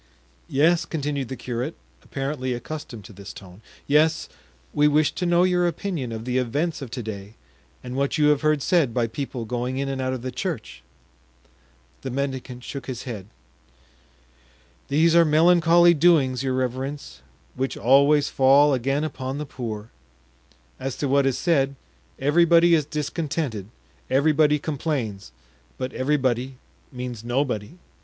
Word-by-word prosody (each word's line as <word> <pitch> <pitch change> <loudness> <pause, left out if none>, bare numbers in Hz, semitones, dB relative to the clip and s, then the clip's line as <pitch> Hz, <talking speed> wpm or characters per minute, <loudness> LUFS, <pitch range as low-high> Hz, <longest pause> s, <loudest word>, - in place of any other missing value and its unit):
"Yes," 165 +5 +3
continued 145 -5 -3
the 130 - -5
curate, 125 +5 -4 0.3
apparently 135 -2 -3
accustomed 120 -3 -7
to 110 - -12
this 100 +1 -10
tone, 95 +1 -13 0.2
"yes, 155 +2 +2 0.4
we 150 0 +4
wish 150 +1 +3
to 180 - -3
know 175 +1 +4
your 180 -1 +2
opinion 165 -7 -3
of 110 0 -6
the 125 0 0
events 145 +7 -1
of 135 - -6
to 120 0 -5
day 105 0 -7 0.5
and 125 0 -6
what 140 +3 0
you 150 -1 +4
have 150 -2 +3
heard 155 -3 +2
said 155 -10 +2
by 120 -2 +2
people 120 0 -5
going 125 +3 -3
in 140 0 -1
and 135 -1 -3
out 130 0 -1
of 125 -2 -5
the 130 - -3
church." 120 - -5 1.2
The - - -5
mendicant 130 -2 -4
shook 140 0 -7
his 125 -3 -5
head. 105 -7 -7 1.6
"These 160 +4 +3
are 170 - +7
melancholy 170 +2 +5
doings, 145 -6 +3
your 130 -1 -1
reverence, 130 - -4 0.3
which 130 +1 -3
always 140 +5 +4
fall 140 +2 +5
again 135 +3 0
upon 135 -3 -4
the 150 - -4
poor. 115 -5 -6 0.9
As 135 -1 -4
to 145 - -1
what 140 0 +3
is 130 - 0
said, 140 -5 +1 0.4
everybody 170 +4 +4
is 155 -3 +3
discontented, 150 - -3 0.4
everybody 150 +2 +3
complains, 140 - -3 0.5
but 130 - -4
'everybody' 130 -2 0 0.3
means 125 -3 -6
'nobody. 125 - -2
135 Hz, 150 wpm, -24 LUFS, 125-150 Hz, 1.6 s, are